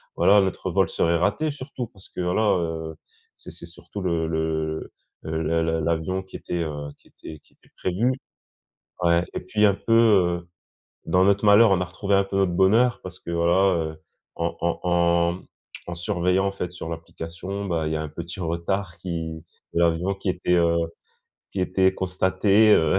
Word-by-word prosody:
voilà 100 +1 +5
notre 95 -2 -2
vol - - +3
serait 85 0 +1
raté 105 - 0
surtout 130 -3 -6
parce 95 -3 -15
que - - -5
voilà, 90 +5 +1 0.2
heu, 80 -1 -4 0.4
c'est - - -12
c'est - - -10
surtout 85 +3 -10
le 85 -3 0
le 80 -1 -2 0.3
le 80 0 -3 0.2
le 80 0 0
l'avion 85 +3 -1
qui 95 - -14
était, 85 -1 -3
heu, 75 -2 -5
qui - - -25
était 80 - -11
qui - - -27
était - - -28
prévu 105 +8 0 0.9
ouais, 85 0 +4
et - - -1
puis 105 +4 0
un 100 - +4
peu, 115 - -3
heu, 95 -7 +4 0.6
dans 90 +3 +3
notre 100 +2 +3
malheur, 105 +1 +7
on 95 - +3
a - - 0
retrouvé 100 +3 -1
un 100 - +4
peu 95 - -6
notre 95 -2 +2
bonheur 110 +7 +3
parce 90 0 -9
que - - -9
voilà, 85 +3 +3 0.2
heu, 80 - -18 0.3
en 85 0 -2
en 85 0 0
en, 85 -1 +3
mmh, 90 - -11 0.4
en 90 - -4
surveillant 90 +1 +1
en - - -1
fait 90 -3 -5
sur 85 -2 -7
l'application, 85 +4 -6
bah, 85 -4 -1
il 80 - -2
y - - 0
a 80 - -2
un 80 - -5
petit 85 +4 -8
retard 85 +2 -2
qui 80 -2 -5 0.3
de - - 0
l'avion 85 +3 +2
qui 95 0 -3
était, 90 0 +1
heu, 85 -1 +3 0.8
qui 95 - -2
était 95 +1 +2
était 95 - -2
constaté, 95 +3 +3
heu. 80 +4 +3
90 Hz, 195 wpm, -24 LUFS, 85-95 Hz, 0.9 s, malheur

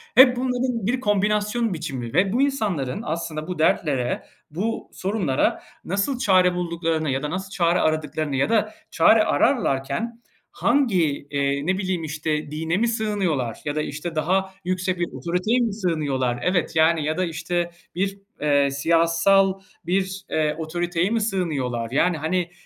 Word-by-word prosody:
hep 255 -1 +8
bunların 250 -3 -1
bir 250 +3 +1
kombinasyon 210 +1 +1
biçimi 135 -8 -5
ve 190 +5 +3
bu 255 - +2
insanların 205 - -1
aslında 160 0 -4
bu 180 -3 -5
dertlere, 135 -6 +1 0.3
bu 210 +9 -3
sorunlara 190 -9 0 0.2
nasıl 200 +8 -1
çare 185 -6 +4
bulduklarını 165 -3 -1
ya 135 +2 -1
da 150 - -2
nasıl 190 +3 -4
çare 170 -1 +2
aradıklarını 155 -2 -1
ya 135 +10 +1
da 215 -1 +1 0.2
çare 215 +6 +5
ararlarken 230 - 0 0.3
hangi, 185 - +1
eee, 140 0 0
ne 185 +3 +1
bileyim, 185 -3 -2
işte, 155 -1 -3
dine 160 +3 -1
mi 235 +3 +2
sığınıyorlar 195 - -1
ya 145 -1 -2
da, 155 - 0
işte, 155 +3 -5
daha 190 +4 0
yüksek 185 0 -1
bir 175 - 0
otoriteye 180 +8 0
mi 230 -4 0
sığınıyorlar? 145 - -1
Evet. 180 -3 0
Yani, 160 0 +4
ya 155 +3 -1
da, 185 - +1
işte, 175 +1 -2 0.2
bir, 195 +2 -1 0.2
eee, 145 -2 +3
siyasal 170 +6 +3 0.3
bir, 190 +1 -1
eee, 155 -1 0
otoriteye 175 +3 -1
mi 230 -1 0
sığınıyorlar? 140 - -2
Yani, 165 +5 +2
hani, 175 +3 -1
175 Hz, 150 wpm, -23 LUFS, 155-200 Hz, 0.3 s, hep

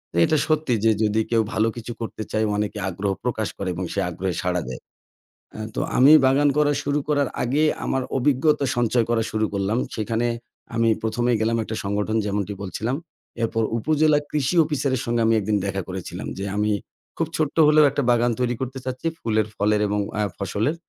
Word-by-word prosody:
এ - - -1
এটা 155 - +2
সত্যি 155 -4 +1
যে 110 - +6
যদি 110 +1 +2
কেউ 115 - +4
ভালো 110 +1 +2
কিছু 120 0 -6
করতে 110 -1 -4
চায় 110 0 +1
অনেকে 105 0 -2
আগ্রহ 95 +3 -2
প্রকাশ 110 -3 -1
করে 95 - -3
এবং 90 +1 -3
সে 100 - -1
আগ্রহে 90 +1 -3
সাড়া 90 -1 0
দেয়। 65 - -6 0.8
আ - - -7 0.2
তো - - -1 0.2
আমি 135 +4 +7
বাগান 140 +2 +4
করা 150 -1 +4
শুরু 145 +1 0
করার 145 -3 +1
আগে 140 +6 +1 0.2
আমার 130 -1 0
অভিজ্ঞতা 145 +2 +2
সঞ্চয় 120 0 +2
করা 115 -1 +2
শুরু 110 0 +1
করলাম। 100 +3 0 0.2
সেখানে 115 +2 -1 0.5
আমি 115 0 +3
১ম 110 +2 -1
এ - - +3
গেলাম 115 +1 +1
একটা 110 - -5
সংগঠন 105 +2 -1
যেমনটি 100 0 -2
বলছিলাম। 110 +8 -2 0.5
এরপর 115 0 0 0.2
উপজেলা 155 +3 +3
কৃষি 150 +2 0
অফিসারের 135 -4 -1
সঙ্গে 120 0 0
আমি 115 - +4
১ - - -4
দিন 105 - +3
দেখা 95 0 -2
করেছিলাম 95 -1 -6
যে, - - -3
"আমি 105 +1 +1 0.5
খুব 165 - 0
ছোট্ট 155 -3 -1
হলেও 150 0 +6
একটা 140 +1 -1
বাগান 120 0 +3
তৈরি 125 -1 0
করতে 130 +1 -4
চাচ্ছি 130 +5 -3
ফুলের, 110 -2 0
ফলের 105 +1 +2
এবং 105 +1 0 0.2
আ - - +2 0.2
ফসলের। 105 - -1
115 Hz, 190 wpm, -23 LUFS, 105-135 Hz, 0.8 s, আমি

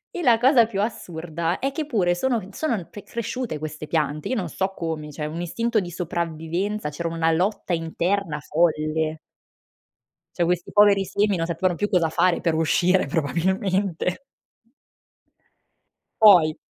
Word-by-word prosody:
E 355 - -3
la 235 -4 +5
cosa 250 -2 +5
più 200 -3 -3
assurda 170 -5 -3
è 270 +1 -2
che 305 0 -3
pure 185 -10 +1
sono 240 +4 0
en 190 0 -12
sono 230 - -2
pe 205 - -10
cresciute 235 - -4
queste 155 0 -6
piante, 150 -1 -1
io 255 - 0
non 185 -6 -2
so 190 +4 -2
come. 160 -4 -4
Cioè, 150 +1 -5
un 160 +3 -4
istinto 230 +5 0
di 175 - -6
sopravvivenza, 170 +2 -3
c'era 165 +3 -4
una 165 0 +1
lotta 185 +2 0
interna 170 0 -1
folle! 155 0 0 1.2
Cioè, 175 - +1
questi 175 0 -1
poveri 205 -2 +5
semi 205 +1 +1
non 165 - -1
sapevano 175 +2 0
più 205 +4 -1
cosa 175 -5 +2
fare 180 +1 +2
per 165 - +1
uscire 175 +3 +2
probabilmente! 185 - -1 2.0
Poi 175 -8 +7
175 Hz, 150 wpm, -23 LUFS, 160-205 Hz, 2.0 s, Poi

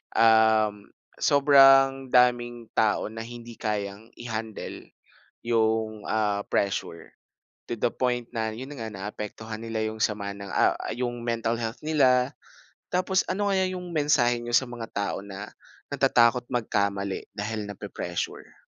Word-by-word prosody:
um, 110 -2 +4 0.3
sobrang 135 -1 +6
daming 120 -2 +3
tao 110 -1 +2
na 115 0 -6
hindi 120 -1 -10
kayang 105 +1 -4
i-handle 110 -2 -6 0.6
yung, 110 -2 +1
ah, 105 -2 +1
pressure 95 -4 -2 0.5
to - - -2
the 115 - +1
point 120 -2 -1
na, 110 -2 -2
'yon 125 +5 -7
na - - -8
nga, 110 - -4
naaapektuhan 105 +2 -6
nila 115 -1 -3
yung 110 0 -7
sama 100 -2 -1
ng, 100 -1 -9
ah, - - +3
ah, - - -4
yung 120 0 -3
mental 115 -1 0
health 115 0 -4
nila. 130 -4 +3 0.6
Tapos 185 +1 +2
ano 200 +2 0
kaya 190 -1 +2
yung 180 -1 -6
mensahe 140 -6 +3
n'yo 120 0 -5
sa 130 - +2
mga 120 -2 -6
tao 100 -1 -2
na 100 0 -8 0.4
natatakot 120 +1 +3
magkamali 100 -5 -1
dahil 105 +1 -3
nape-pressure? 100 -3 -6
115 Hz, 135 wpm, -26 LUFS, 105-125 Hz, 0.6 s, sobrang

